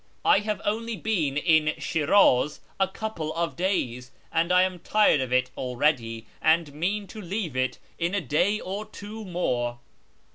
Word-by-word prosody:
I 420 - +6
have 210 0 -2
only 225 +2 -1
been 160 -8 0
in 155 -1 +3
Shiraz 150 -3 +3 0.2
a 195 - +3
couple 190 -6 -4
of 170 0 -1
days, 125 -10 -1 0.2
and 170 +2 +1
I 180 0 +6
am 185 -1 -2
tired 210 -7 +3
of 130 -1 -3
it 125 0 +2
already, 120 -3 0 0.2
and 160 -2 +3
mean 195 +7 -1
to 215 +2 -9
leave 180 - -3
it 130 0 0 0.2
in 170 +4 0
a - - +2
day 180 +8 +1
or 195 +3 -4
two 215 +1 -8
more." 125 -11 -1
170 Hz, 160 wpm, -26 LUFS, 140-205 Hz, 0.2 s, I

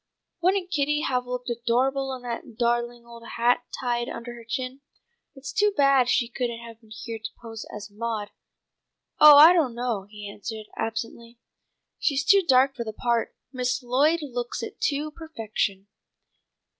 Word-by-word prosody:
"Wouldn't 365 0 +1
Kitty 295 -2 +1
have 250 -4 -1
looked 250 0 -4
adorable 255 +4 0
in 250 - -11
that 235 -2 -6
darling 240 0 0
old 235 0 -12 0.2
hat 240 +1 +2
tied 240 -1 -1
under 235 +1 -7
her 235 -1 -11
chin? 255 +3 -4 0.5
It's 270 0 -8
too 415 -2 +2
bad 275 -3 +4
she 240 -2 +2
couldn't 240 -1 -3
have 230 -1 -12
been 220 - -21
here 225 +1 -7
to 220 +1 -5
pose 225 -2 -8
as 205 0 -8
Maud." 215 -1 -4 0.9
"Oh, 300 -1 +10
I 315 +4 +10
don't 290 -9 +1
know," 235 -5 -2
he 210 -1 -9
answered 215 +2 -7
absently. 230 +1 -5 0.6
"She's 280 -2 0
too 400 +4 +6
dark 270 -4 +4
for 235 - -3
the 220 -1 -6
part. 235 +1 -1 0.2
Miss 250 0 -1
Lloyd 290 +7 +2
looks 245 -3 -4
it - - -8
to 295 +1 -3
perfection." 225 - -3
240 Hz, 160 wpm, -25 LUFS, 230-275 Hz, 0.9 s, Oh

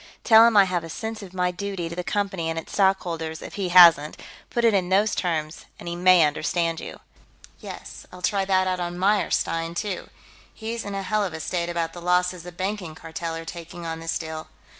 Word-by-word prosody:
Tell 225 -1 +8
him 230 -3 +3
I 200 - +9
have 180 -3 -1
a 165 - -8
sense 220 +6 -5
of 195 -3 -10
my 180 -1 0
duty 190 -1 -4
to 170 - -7
the 180 - -3
Company 195 -4 -2
and 165 - -3
its 165 - -7
stockholders, 170 -5 0
if - - -9
he 195 -3 -2
hasn't; 170 -4 +7 0.3
put 235 -1 0
it 230 - +5
in 185 -3 +1
those 205 +3 +3
terms 160 -3 -2
and - - -10
he 170 - -3
may 180 -1 +6
understand 165 +2 -1
you." - - -9 0.6
"Yes, - - -10
I'll 180 0 -12
try 195 +2 +1
that 190 -1 +2
out 185 -1 -1
on 175 0 -4
Meyerstein, 180 -4 0
too. 200 0 -4 0.5
He's 225 0 -5
in 200 -1 -5
a 195 - -3
hell 210 +3 0
of 185 -5 -3
a 160 - -5
state 170 +1 -2
about 165 -1 -2
the 175 - -9
losses 180 0 +1
the 180 +1 -9
Banking 185 -2 -4
Cartel 165 +1 -5
are 165 0 -7
taking 170 +1 -8
on 165 0 -4
this 165 0 -2
deal.... 160 -1 -6
180 Hz, 220 wpm, -24 LUFS, 165-195 Hz, 0.6 s, I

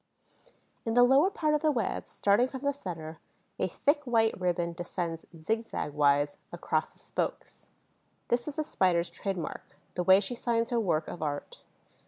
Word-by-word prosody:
In 225 0 -1
the 245 - +7
lower 270 +8 +5
part 315 -7 0
of 300 - +2
the 310 - +3
web, 235 -7 -2
starting 205 +5 +3
from 260 0 -7
the 285 0 +1
center, 165 - -7 0.4
a - - +2
thick 290 +1 +1
wide 225 -4 +2
ribbon 175 -1 0
descends 170 -1 -4
zigzag 225 -4 -2
wise 145 0 +2
across - - -1
the - - -27
spokes. - - -4 0.6
This 240 +2 +1
is 295 - -4
the 310 - 0
Spider's 175 - +1
trademark, 190 -4 -5 0.2
the 180 - -1
way 190 +2 +7
she 205 +4 -3
signs 230 -1 0
her 240 - +2
work 165 -7 0
of 175 - -7
art. 145 -2 -4
200 Hz, 170 wpm, -30 LUFS, 170-245 Hz, 0.6 s, the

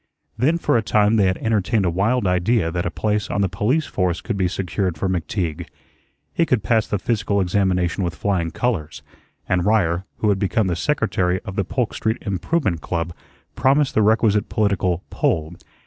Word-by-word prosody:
Then 140 +9 +2
for 165 - +1
a - - +2
time 105 0 +2
they 100 -3 +4
had 95 - 0
entertained 110 -1 +1
a 85 - +2
wild 105 +7 +1
idea 90 0 +1
that 85 0 -2
a - - 0
place 105 +2 -1
on 100 - 0
the 100 - +3
police 110 - 0
force 90 -2 -1
could 115 - -4
be 95 -2 +1
secured 90 -1 -2
for 95 - -1
McTeague. 85 -2 -2 0.7
He 170 - +2
could 125 -10 +1
pass 110 0 +2
the 105 - -1
physical 100 -1 0
examination 90 -1 +1
with 85 -1 -2
flying 90 -5 -1
colors, 80 -5 -2 0.4
and 90 -1 +1
Ryer, 95 -4 +1
who 105 - +1
had 100 -2 +2
become 105 +2 +1
the 90 -2 0
secretary 95 - 0
of 95 -3 -6
the 100 - +1
Polk 95 +6 -2
Street 110 +1 -1
Improvement 100 - -1
Club, 85 -1 -3 0.4
promised 140 +1 +2
the 110 - +3
requisite 105 -1 +2
political 95 -4 0
"pull." 80 0 0
100 Hz, 185 wpm, -21 LUFS, 90-110 Hz, 0.7 s, they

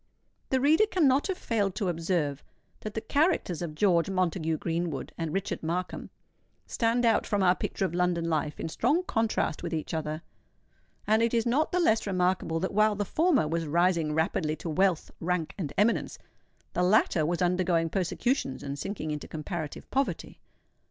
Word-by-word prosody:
The 260 - +2
reader 315 +11 +4
cannot 290 -8 +3
have 380 -2 -2
failed 205 - -1
to 195 0 -1
observe 165 -4 -1 0.4
that 215 0 -7
the 220 - -1
characters 285 - +1
of 160 -3 -4
George 175 -1 +3
Montague 170 -4 0
Greenwood 165 -2 -3
and 165 -2 -3
Richard 195 +3 -2
Markham 175 +3 -3 0.6
stand 235 +1 +1
out 230 - +3
from 205 -3 +1
our 180 -1 +5
picture 190 - -2
of 175 - -3
London 175 -1 +1
Life 155 -2 -1
in - - -3
strong 275 - +1
contrast 225 - 0
with 170 -1 -3
each 155 - -4
other; 155 0 -3 0.8
and 220 +1 +3
it 230 +1 +2
is 230 - +2
not 275 +7 +1
the 360 - +1
less 225 -11 +2
remarkable 180 -3 0
that 190 - -2
while 215 +1 +3
the 205 0 -2
former 310 - +2
was 165 0 -2
rising 170 -1 +2
rapidly 160 -1 0
to 165 - -6
wealth, 185 0 +1
rank, 170 -2 -1
and 155 -8 -4
eminence, 220 +3 +1 0.6
the - - 0
latter 180 -3 +3
was 170 +3 0
undergoing 180 -2 +2
persecutions 185 - -1
and 140 0 -5
sinking 175 -2 -4
into 150 -1 -5
comparative 155 -1 -5
poverty. 275 0 -2
180 Hz, 170 wpm, -28 LUFS, 165-220 Hz, 0.8 s, our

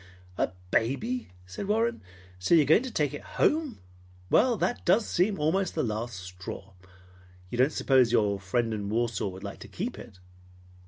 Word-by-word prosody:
"A - - 0 0.2
baby!" 220 - 0 0.2
said 95 - -6
Warren. 225 +3 +1 0.4
"So 90 - +3
you 160 - +6
are - - -3
going 155 - +5
to 260 - -5
take 150 -7 0
it 145 - -6 0.2
home! 305 -5 +2 0.5
Well, 245 -3 +4
that 240 - -1
does 200 +5 +3
seem 190 +3 +1
almost 170 +5 0
the - - +1
last 115 0 -3
straw! 90 +1 -8 0.8
You 120 - -3
don't 130 +4 +4
suppose 130 -5 +3
your 105 -4 +2
friend 115 +4 -1
in 100 -2 -3
Warsaw 115 -2 0
would 95 0 -8
like 100 - -7
to - - -10
keep 230 +7 -5
it?" 100 - -12
130 Hz, 175 wpm, -28 LUFS, -, 0.8 s, you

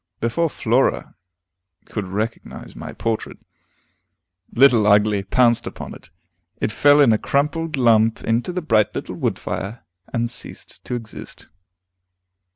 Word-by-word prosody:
Before 140 +9 0
Flora 125 0 0 0.7
could 105 -4 -5
recognize 110 +4 -5
my - - -7
portrait, 115 -1 -3 1.1
Little 120 -5 +5
Ugly 105 -1 +3
pounced 120 +3 +2
upon - - -7
it; - - -14 0.5
it - - -1
fell 145 +6 +5
in 125 -6 +5
a 110 - +1
crumpled 150 +2 -1
lump 115 -3 +3
into 115 +9 0
the 180 -1 -4
bright 110 -8 +2
little - - -5
wood - - -2
fire, 105 +5 -5 0.3
and 120 0 0
ceased 120 - -6
to 125 - -3
exist. 115 -2 -8
115 Hz, 130 wpm, -21 LUFS, 110-135 Hz, 1.1 s, Little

